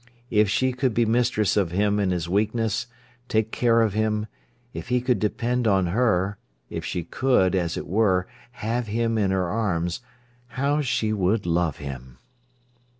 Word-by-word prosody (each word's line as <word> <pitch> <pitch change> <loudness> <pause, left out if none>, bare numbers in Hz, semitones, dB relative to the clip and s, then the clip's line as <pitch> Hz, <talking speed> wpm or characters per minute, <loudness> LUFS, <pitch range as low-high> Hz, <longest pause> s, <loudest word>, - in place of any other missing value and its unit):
If 105 -2 +3
she 130 +5 +1
could 125 -3 -1
be 120 - +3
mistress 115 -3 +1
of 100 -5 +2
him 100 +3 +1
in 100 -2 +1
his 90 -2 -1
weakness, 110 +5 0 0.4
take 110 -1 0
care 115 -1 +3
of 110 -3 0
him, 105 0 0 0.5
if - - -7
he 125 0 +2
could 125 0 0
depend 120 +3 0
on 95 -3 +3
her, 100 -4 +1 0.3
if - - -4
she 90 - -3
could, 95 -1 +2
as 85 -3 -1
it - - -4
were, 95 -2 +2 0.3
have 115 +1 -2
him 115 +1 0
in 100 -2 +2
her 95 -2 0
arms, 90 -2 -1 0.6
how 145 +3 +1
she 120 -5 0
would 100 +1 +1
love 85 -1 0
him! 65 -3 -8
105 Hz, 165 wpm, -24 LUFS, 95-115 Hz, 0.6 s, If